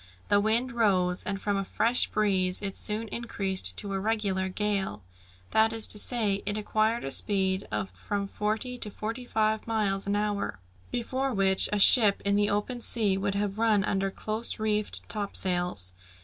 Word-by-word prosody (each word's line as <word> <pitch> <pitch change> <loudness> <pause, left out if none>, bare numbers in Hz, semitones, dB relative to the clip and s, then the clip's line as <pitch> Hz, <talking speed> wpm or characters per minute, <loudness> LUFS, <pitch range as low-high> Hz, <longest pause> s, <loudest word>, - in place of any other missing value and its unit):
The 205 - +4
wind 230 +4 0
rose, 185 -6 +1
and 200 -1 -4
from 200 0 -2
a 195 - -2
fresh 230 +5 +1
breeze 190 -3 0
it 195 -1 -4
soon 215 +1 -1
increased 200 -5 +6
to 200 -1 -2
a 195 - -2
regular 195 -3 -1
gale; 195 - -3 0.5
that 220 0 +3
is 225 -1 +2
to 210 - -2
say, 205 -4 0
it 205 0 -1
acquired 215 +2 -1
a 135 - -4
speed 190 +2 -1
of 105 -2 -3
from 200 - -4
forty 220 +5 -4
to 215 - -1
forty 225 +4 -6
five 220 -1 -1
miles 200 -3 -1
an 200 - 0
hour, 205 - -2 0.3
before 260 +2 -3
which 190 -1 +3
a 210 - 0
ship 205 0 +6
in 200 0 +1
the 205 0 +1
open 220 +4 -3
sea 215 -5 +2
would 195 +1 -2
have 205 0 -3
run 220 -3 +2
under 195 0 -1
close 215 +4 -3
reefed 215 -1 -1
topsails. 180 - -2
205 Hz, 175 wpm, -27 LUFS, 195-220 Hz, 0.5 s, increased